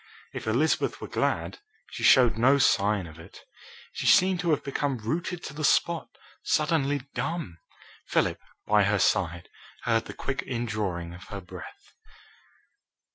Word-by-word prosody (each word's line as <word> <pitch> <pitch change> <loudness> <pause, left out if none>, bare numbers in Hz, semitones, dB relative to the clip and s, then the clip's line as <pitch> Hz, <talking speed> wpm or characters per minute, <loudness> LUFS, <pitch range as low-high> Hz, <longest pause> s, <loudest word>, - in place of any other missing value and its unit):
If - - -6
Elizabeth 130 +9 +1
were - - -6
glad, - - -1 0.3
she - - -7
showed 125 -4 +6
no 130 +5 +4
sign 105 -7 +2
of 80 0 -12
it. 85 - -13 0.5
She - - -3
seemed 185 0 +5
to 175 -1 -1
have 150 - +1
become 140 -1 -2
rooted 170 +10 -3
to - - -7
the 155 +1 -6
spot, 170 +2 +2 0.3
suddenly 145 -3 +1
dumb. 160 - -4 0.5
Philip, - - +1 0.3
by 105 0 +4
her 100 +1 +2
side, 85 -3 +1 0.4
heard 115 -1 +1
the - - -9
quick 140 +1 -3
indrawing 105 -8 -3
of 90 - -11
her 100 - -7
breath. 90 -1 -12
120 Hz, 145 wpm, -27 LUFS, 100-150 Hz, 0.5 s, showed